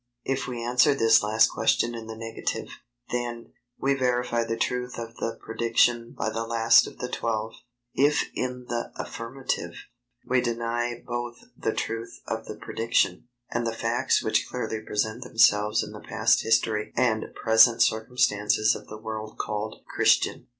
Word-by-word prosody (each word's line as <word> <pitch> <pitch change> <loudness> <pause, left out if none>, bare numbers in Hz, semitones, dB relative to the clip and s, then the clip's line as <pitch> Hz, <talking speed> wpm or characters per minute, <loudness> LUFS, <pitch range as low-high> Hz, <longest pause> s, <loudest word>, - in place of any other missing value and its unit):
If 135 0 -1
we 120 -2 -4
answer 125 +4 +4
this 115 -4 +5
last 110 +1 +4
question 120 - +1
in 115 -1 -7
the 110 - -6
negative, 115 0 -4 0.4
then, 120 -1 -4 0.3
we 140 +1 +2
verify 125 -3 0
the 115 0 -3
truth 125 +1 -2
of 115 -1 -6
the 115 - -3
prediction 115 +1 +1
by 110 - -1
the 115 +1 -2
last 115 0 +4
of - - -11
the 125 - -4
Twelve; 110 -2 -2 0.4
if 145 +2 +3
in 125 0 -4
the 120 -1 -3
affirmative, 125 +3 -4 0.5
we 125 0 +2
deny 120 0 -2
both 120 0 -5
the - - -2
truth 115 +1 -4
of 110 0 -4
the 105 - -7
prediction, 115 -2 0 0.2
and 120 0 -1
the 115 - -2
facts 115 +1 +1
which - - +1
clearly 110 -1 -3
present 110 +2 -2
themselves 110 -2 +3
in 105 - -8
the 105 - -9
past - - +2
history 110 -1 +1
and 115 -3 +2
present 115 +1 +5
circumstances 110 -2 +2
of - - -8
the 110 - -8
world 110 0 -6
called 105 +1 -4
"Christian." - - +2
115 Hz, 155 wpm, -26 LUFS, 110-120 Hz, 0.5 s, this